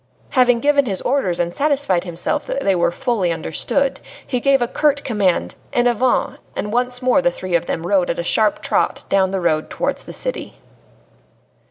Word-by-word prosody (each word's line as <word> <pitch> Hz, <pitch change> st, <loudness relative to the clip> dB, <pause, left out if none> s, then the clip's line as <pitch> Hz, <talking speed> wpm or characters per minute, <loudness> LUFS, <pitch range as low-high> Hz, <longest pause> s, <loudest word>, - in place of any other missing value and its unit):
Having 245 Hz, -3 st, +3 dB
given 285 Hz, -2 st, +3 dB
his 195 Hz, -3 st, -1 dB
orders 245 Hz, -10 st, 0 dB
and 175 Hz, 0 st, -1 dB
satisfied 275 Hz, -, +1 dB
himself 175 Hz, -, -1 dB
that 275 Hz, -, -2 dB
they 195 Hz, -, +3 dB
were 175 Hz, -1 st, +1 dB
fully 205 Hz, -4 st, -1 dB
understood, 265 Hz, -, -1 dB, 0.3 s
he 250 Hz, -, -1 dB
gave 275 Hz, +2 st, +3 dB
a 240 Hz, -, 0 dB
curt 285 Hz, +2 st, +1 dB
command, 205 Hz, -7 st, 0 dB, 0.2 s
"En 245 Hz, -, +2 dB
avant," 255 Hz, -, +1 dB, 0.2 s
and 210 Hz, +1 st, -3 dB
once 250 Hz, +1 st, -1 dB
more 255 Hz, +2 st, +3 dB
the 265 Hz, -, +3 dB
three 185 Hz, -8 st, -6 dB
of 170 Hz, 0 st, +1 dB
them 165 Hz, -, -3 dB
rode 185 Hz, -1 st, +2 dB
at -, -, -1 dB
a 170 Hz, -, -2 dB
sharp 215 Hz, +4 st, +1 dB
trot -, -, 0 dB
down 190 Hz, -1 st, +3 dB
the 195 Hz, 0 st, -2 dB
road 155 Hz, -3 st, 0 dB
towards -, -, -3 dB
the -, -, -9 dB
city. -, -, -4 dB
235 Hz, 190 wpm, -19 LUFS, 180-270 Hz, 0.3 s, Having